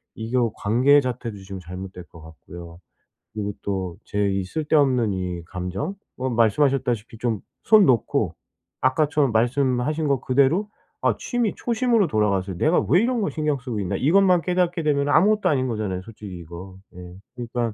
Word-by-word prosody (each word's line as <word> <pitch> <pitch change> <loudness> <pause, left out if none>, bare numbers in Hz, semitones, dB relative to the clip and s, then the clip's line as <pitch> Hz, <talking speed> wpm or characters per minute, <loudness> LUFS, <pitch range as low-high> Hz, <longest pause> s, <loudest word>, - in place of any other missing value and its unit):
이거 115 +1 0
관계 130 +8 +4
자체도 120 -4 -4
지금 95 0 -8
잘못될 90 +1 -8
것 80 -2 -15
같고요. 85 +2 -12 0.5
그리고 105 -1 -3
또 95 -3 -3
제 100 -1 0
이 95 0 -1
쓸데없는 135 -2 +1
이 90 -2 -4
감정 90 - -4 0.2
뭐 130 +1 -2
말씀하셨다시피 120 -1 +1
좀 115 -4 -1 0.2
손 215 -3 +6
놓고 120 -5 +1 0.5
아까처럼 145 0 +2
말씀하신 130 +5 +1
거 135 -3 +1
그대로 140 +11 +2 0.3
아 - - +2
취미 240 -4 -1
초심으로 235 -4 +1
돌아가서 100 -6 0
'내가 155 - +2
왜 180 - +5
이런 240 0 0
거 200 - 0
신경 150 -2 -1
쓰고 125 -4 -5
있나?' 90 - -2
이것만 180 +4 +4
깨닫게 180 -1 0
되면은 145 -1 +1
아무것도 200 +5 +4
아닌 130 -3 +1
거잖아요 105 -5 -3
솔직히 100 -2 -10
이거. 85 +3 -10 0.2
예. 90 0 -10 0.2
그러니까 120 -2 -3
120 Hz, 355 characters per minute, -23 LUFS, 95-150 Hz, 0.5 s, 손